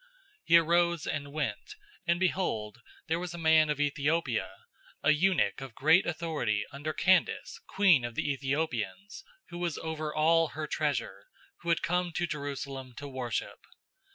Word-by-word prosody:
008:027 -, -, -29 dB, 0.4 s
He 170 Hz, -, +7 dB
arose 170 Hz, 0 st, +2 dB
and 145 Hz, -2 st, -3 dB
went; 140 Hz, -9 st, -4 dB, 0.3 s
and 170 Hz, 0 st, +2 dB
behold, 125 Hz, -, -1 dB, 0.2 s
there 165 Hz, +1 st, 0 dB
was 175 Hz, -1 st, -5 dB
a -, -, -7 dB
man 160 Hz, -2 st, +4 dB
of 150 Hz, -1 st, -1 dB
Ethiopia, 145 Hz, -3 st, 0 dB, 0.5 s
a 140 Hz, -, +5 dB
eunuch 170 Hz, -1 st, +2 dB
of 130 Hz, -5 st, -8 dB
great 160 Hz, +6 st, +4 dB
authority 155 Hz, -11 st, -1 dB
under 145 Hz, +3 st, -4 dB
Candace, 180 Hz, +3 st, +1 dB
queen 190 Hz, -10 st, +4 dB
of 120 Hz, -1 st, -5 dB
the -, -, -1 dB
Ethiopians, 140 Hz, -, -3 dB, 0.3 s
who 175 Hz, -, -7 dB
was 175 Hz, -3 st, -2 dB
over 155 Hz, -1 st, -4 dB
all 165 Hz, +2 st, +3 dB
her 155 Hz, 0 st, -3 dB
treasure, 150 Hz, -, -2 dB, 0.3 s
who 170 Hz, -, -5 dB
had 170 Hz, -, +2 dB
come 180 Hz, 0 st, 0 dB
to 175 Hz, -, 0 dB
Jerusalem 140 Hz, -4 st, -5 dB
to 145 Hz, +4 st, -7 dB
worship. 130 Hz, -3 st, -4 dB
155 Hz, 155 wpm, -30 LUFS, 140-170 Hz, 0.5 s, He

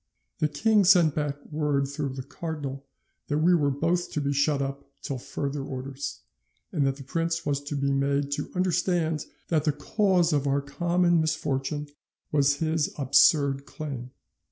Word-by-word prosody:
The 155 Hz, -, +3 dB
king 210 Hz, +8 st, +3 dB
sent 175 Hz, -5 st, +6 dB
back 145 Hz, -2 st, -2 dB
word 145 Hz, -2 st, 0 dB
through 140 Hz, -1 st, -4 dB
the 130 Hz, -, -5 dB
cardinal 140 Hz, -2 st, -6 dB, 0.4 s
that 145 Hz, -, 0 dB
we 170 Hz, +4 st, +4 dB
were 150 Hz, -5 st, +3 dB
both 165 Hz, +6 st, 0 dB
to 155 Hz, -, 0 dB
be 140 Hz, -1 st, 0 dB
shut 140 Hz, +1 st, +2 dB
up 140 Hz, 0 st, -3 dB, 0.2 s
till 135 Hz, -2 st, -3 dB
further 140 Hz, +3 st, -4 dB
orders, 135 Hz, -, -5 dB, 0.5 s
and 140 Hz, -2 st, +1 dB
that 135 Hz, -, 0 dB
the 140 Hz, -, -10 dB
prince 165 Hz, +4 st, -2 dB
was 140 Hz, -1 st, 0 dB
to 145 Hz, -, -4 dB
be 140 Hz, 0 st, 0 dB
made 140 Hz, +1 st, 0 dB
to 145 Hz, +1 st, -2 dB
understand 175 Hz, -3 st, 0 dB, 0.2 s
that 155 Hz, -3 st, +2 dB
the 155 Hz, -, +2 dB
cause 180 Hz, 0 st, +1 dB
of 145 Hz, -1 st, +1 dB
our 140 Hz, +1 st, +2 dB
common 170 Hz, +4 st, +2 dB
misfortune 150 Hz, -2 st, -1 dB, 0.4 s
was 140 Hz, -1 st, +3 dB
his 160 Hz, 0 st, 0 dB
absurd 140 Hz, 0 st, +4 dB
claim. 135 Hz, -6 st, -6 dB
145 Hz, 165 wpm, -27 LUFS, 140-160 Hz, 0.5 s, sent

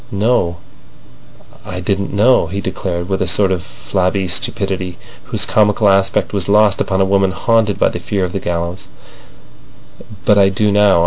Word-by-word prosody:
"No; 100 Hz, -4 st, 0 dB, 1.1 s
I 90 Hz, -, -6 dB
didn't 100 Hz, +1 st, -2 dB
know," 110 Hz, +6 st, +3 dB
he 100 Hz, -, -4 dB
declared, 90 Hz, -2 st, -4 dB
with 95 Hz, -1 st, -2 dB
a 95 Hz, -, 0 dB
sort 95 Hz, +1 st, +2 dB
of 90 Hz, -2 st, -1 dB
flabby 90 Hz, +9 st, -2 dB
stupidity, 95 Hz, -4 st, -2 dB, 0.3 s
whose -, -, +1 dB
comical 105 Hz, 0 st, +2 dB
aspect 95 Hz, +1 st, +1 dB
was 100 Hz, -2 st, -2 dB
lost 105 Hz, -1 st, +3 dB
upon 95 Hz, -1 st, 0 dB
a -, -, +3 dB
woman 95 Hz, 0 st, +2 dB
haunted 110 Hz, +1 st, +1 dB
by -, -, +2 dB
the -, -, -6 dB
fear 95 Hz, +2 st, -2 dB
of 90 Hz, -, -7 dB
the 100 Hz, -, -2 dB
gallows, 85 Hz, 0 st, -4 dB, 1.4 s
"but 105 Hz, -1 st, +4 dB
I 95 Hz, -1 st, +5 dB
do 105 Hz, +2 st, 0 dB
now. 100 Hz, -3 st, +4 dB
95 Hz, 170 wpm, -16 LUFS, 90-105 Hz, 1.4 s, I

